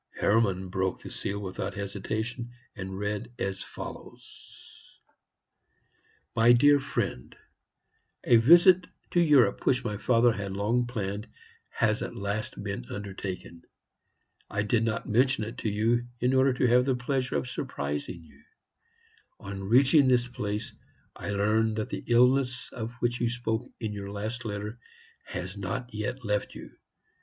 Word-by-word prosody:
Hermann 100 -4 +2
broke 95 0 -2
the - - -8
seal 100 - -3
without 95 0 -4
hesitation, 110 +4 -4 0.3
and 95 -1 -6
read 105 +3 -3
as 95 -1 -3
follows: - - -11 1.4
"MY 115 +2 +6
DEAR 145 +4 +6
FRIEND, 100 - -3 0.9
A 120 - +6
visit 175 +8 +7 0.2
to 175 - +3
Europe 140 -11 +4
which 130 -1 +3
my 105 -4 -3
father 120 +2 +4
had 100 -2 -4
long 115 +5 +1
planned 105 -3 -4 0.4
has - - +1
at - - -5
last 100 +2 -3
been - - -4
undertaken. 95 -4 -6 0.9
I 100 - -1
did 110 +2 +1
not 115 -1 -2
mention 125 +2 +2
it 110 +2 -6
to 110 - -1
you, 115 +4 +1
in 125 +2 +2
order 130 0 +4
to 125 - +1
have 125 +1 +4
the 135 -2 +2
pleasure 125 - -1
of 70 -3 -1
surprising 75 +6 -4
you. - - -19 1.0
On 95 -1 -6
reaching 135 +7 +5
this 125 -1 +3
place, 105 -2 -4 0.4
I - - -6
learn 105 +2 +2
that 110 -1 -3
the - - -4
illness 125 +1 +3
of 115 0 -5
which 120 0 0
you 120 - +2
spoke 120 0 -2
in 110 -3 -3
your 100 -1 -6
last 110 +4 -4
letter 105 +2 -5 0.5
has 90 +2 -5
not 105 +5 -4
yet 120 +4 -4
left 105 -1 -1
you. - - -10
110 Hz, 145 wpm, -28 LUFS, 100-125 Hz, 1.4 s, visit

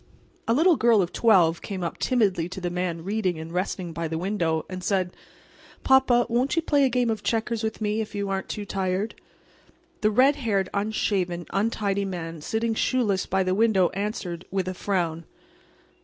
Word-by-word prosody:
A 230 - +3
little 330 +2 +4
girl 230 -2 +4
of 175 - -6
twelve 180 -8 +4
came 190 -3 -5
up 170 - -4
timidly 200 -9 +1
to 185 - -6
the 175 -1 -3
man 175 -2 -2
reading 195 -3 -1
and 160 +1 -7
resting 180 -1 -2
by 165 0 -3
the 160 0 -3
window, 170 -3 -1
and 185 -1 -7
said: 185 -2 0 0.7
"Papa, 265 -2 +4
won't 245 +6 +1
you 330 - +1
play 290 -3 +3
a - - +2
game 245 -2 +1
of 220 -2 -3
checkers 225 +1 -1
with 220 0 -3
me 210 +1 0
if 210 -1 -6
you 200 0 -2
aren't 195 -1 -3
too 210 -2 -4
tired?" 190 +2 -2 0.9
The 215 - +4
red 265 +7 +4
haired, 200 -8 0
unshaven, 200 -4 -1
untidy 200 -1 0
man 165 -4 -5
sitting 225 +7 -1
shoeless 220 -5 0
by 190 0 +1
the 185 0 0
window 200 -3 +3
answered, 190 -4 -4
with 190 -1 -2
a 185 - -2
frown. 175 -4 -2
200 Hz, 185 wpm, -25 LUFS, 180-225 Hz, 0.9 s, little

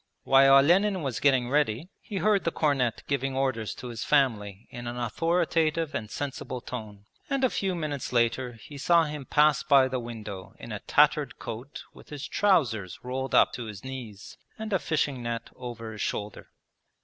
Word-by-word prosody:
While 135 0 +6
Olenin 180 +6 +4
was 130 -5 -2
getting 130 -3 +2
ready, 145 - +1
he 205 - -9
heard 205 0 +2
the - - +1
cornet 135 -8 0
giving 135 -1 -1
orders 130 -5 -1
to 125 - -8
his 115 -3 -5
family 110 -8 +1
in 120 0 -7
an 120 +1 -4
authoritative 165 +4 0
and 110 -2 -4
sensible 135 -2 -5
tone, 110 -5 -8 0.2
and 275 -1 0
a 260 - +3
few 190 -2 -1
minutes 150 -5 -4
later 120 +1 +1
he 140 +5 -11
saw 170 +4 +4
him 150 -3 -5
pass 150 0 +4
by 140 -3 +5
the 130 -1 -2
window 110 -5 -8
in - - -9
a - - -4
tattered - - +2
coat 120 +5 -7
with - - -16
his 145 -1 -6
trousers 125 - +1
rolled 130 +1 -2
up - - +5
to 120 - -5
his 105 -3 -8
knees 125 -6 -8 0.2
and 220 -1 -5
a 190 - +3
fishing 145 -6 -1
net 115 -1 -4
over 120 -3 -7
his 105 -2 -7
shoulder. 105 -1 -4
130 Hz, 180 wpm, -27 LUFS, 115-155 Hz, 0.2 s, While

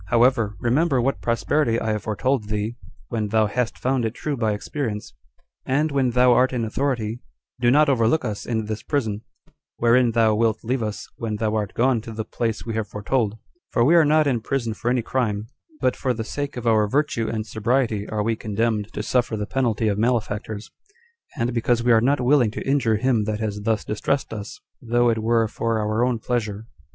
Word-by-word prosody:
However, 115 -1 +3
remember 135 +3 +2
what 135 +3 0
prosperity 115 +1 +1
I 110 - -1
have 105 -1 -1
foretold 110 +4 -1
thee 105 +2 -2 0.3
when 110 -3 -1
thou 110 +1 +3
hast 120 +3 -2
found 130 -1 0
it 110 +1 -2
true 150 -2 -3
by 110 -4 0
experience; 105 0 -4 0.5
and 145 +4 +1
when 135 -2 +2
thou 125 +1 +5
art 125 +2 +3
in 120 -3 -1
authority, 115 -2 -2 0.4
do 120 -1 +3
not 150 +4 +5
overlook 130 +2 +2
us 105 -3 -4
in 110 -2 -1
this 110 0 -4
prison, 110 -8 -2 0.6
wherein 120 0 +3
thou 110 -1 +4
wilt 110 0 +1
leave 125 +2 -1
us 105 -1 -4
when 115 -2 -3
thou 110 0 -1
art 105 -3 -2
gone 125 -1 +2
to 115 +1 -9
the 110 0 -4
place 115 -1 -3
we 115 - -3
have 110 -1 -2
foretold; 105 +1 -1 0.3
for 120 - +2
we 155 - +5
are 170 -2 +7
not 155 +1 +4
in 125 -5 +1
prison 115 -2 -2
for 115 - -3
any 125 -1 +1
crime; 110 -5 -1 0.3
but 130 - +1
for 125 -2 -1
the 110 - -3
sake 140 +3 -4
of 120 - -5
our 110 -2 +3
virtue 125 -2 0
and 110 -1 -3
sobriety 110 -1 0
are 105 -1 -1
we 115 +1 0
condemned 110 0 -1
to - - -3
suffer 120 -3 0
the 105 - -2
penalty 115 -3 0
of 100 -1 0
malefactors, 110 -2 -1 0.7
and 120 +1 -1
because 120 0 +1
we 120 - +3
are 115 -1 +6
not 140 +4 +2
willing 125 -2 +4
to 105 - -6
injure 135 -5 +2
him 115 -2 +1
that 110 0 -2
has 105 -2 -3
thus 110 -1 0
distressed 135 +4 -1
us, 105 -1 -7 0.2
though 120 0 +2
it 115 - -1
were 115 0 +2
for 115 +1 -1
our 110 +2 0
own 125 -1 +1
pleasure." 110 -2 -3
115 Hz, 205 wpm, -23 LUFS, 110-125 Hz, 0.7 s, are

